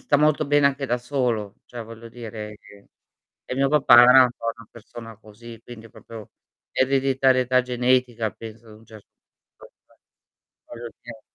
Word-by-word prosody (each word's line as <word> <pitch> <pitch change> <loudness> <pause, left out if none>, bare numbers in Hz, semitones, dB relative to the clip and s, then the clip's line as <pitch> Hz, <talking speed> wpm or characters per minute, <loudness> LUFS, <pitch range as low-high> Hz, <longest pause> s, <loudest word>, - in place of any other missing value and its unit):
sta 145 - +1
molto 150 +1 +2
bene 145 0 +3
anche 140 0 -1
da 120 -1 -1
solo. 120 -5 -3
Cioè, 120 -1 -9
voglio 115 +1 -12
dire 110 -3 -9
che 100 0 -19 0.6
e - - -4
mio 135 +1 +1
papà 135 -5 +6
era 125 +2 +7
un 125 - -1
po' 115 - -3
una 115 - -16
persona 115 0 -12
così, 115 +2 -14
quindi 115 -2 -12
proprio 110 -1 -13 0.4
ereditarietà 130 -1 +1
genetica, 125 -2 0
penso, 115 0 -12
ad 110 - -14
un 110 - -20
cer 110 -2 -14 0.5
punto - - -17 0.9
voglio 120 0 -9
dire. 115 -2 -12
120 Hz, 160 wpm, -23 LUFS, 115-130 Hz, 0.9 s, era